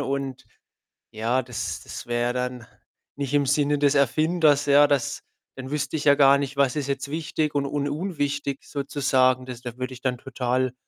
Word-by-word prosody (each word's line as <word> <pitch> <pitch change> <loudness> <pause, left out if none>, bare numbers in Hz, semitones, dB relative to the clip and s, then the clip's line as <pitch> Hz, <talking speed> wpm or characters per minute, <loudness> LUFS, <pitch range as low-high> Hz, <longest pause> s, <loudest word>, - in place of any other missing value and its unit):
und 135 -1 -3 0.7
ja, 115 +4 0
das 125 -3 -5
das - - -8
wär 120 +1 0
dann 125 -2 -3 0.5
nicht 140 -1 -4
im 145 -1 +3
Sinne 145 +1 +2
des 145 0 +3
Erfinders, 150 +1 +3
ja. 145 +1 +6
Das 140 -4 -1 0.3
dann 130 0 -7
wüsste 150 0 -2
ich 145 - -5
ja 140 -1 +6
gar 140 0 +6
nicht, 140 0 -4
was 140 -2 +2
ist 145 -2 -2
jetzt 140 +1 -3
wichtig 155 -1 -2
und 140 -1 0
un 145 0 -2
unwichtig 145 -4 -3
sozusagen. 130 -3 +1
Das 125 -2 -8
da 125 -1 -7
würde 130 0 -4
ich 125 - -12
dann 125 -2 -1
total, 130 -1 -1
140 Hz, 180 wpm, -24 LUFS, 130-145 Hz, 0.7 s, ja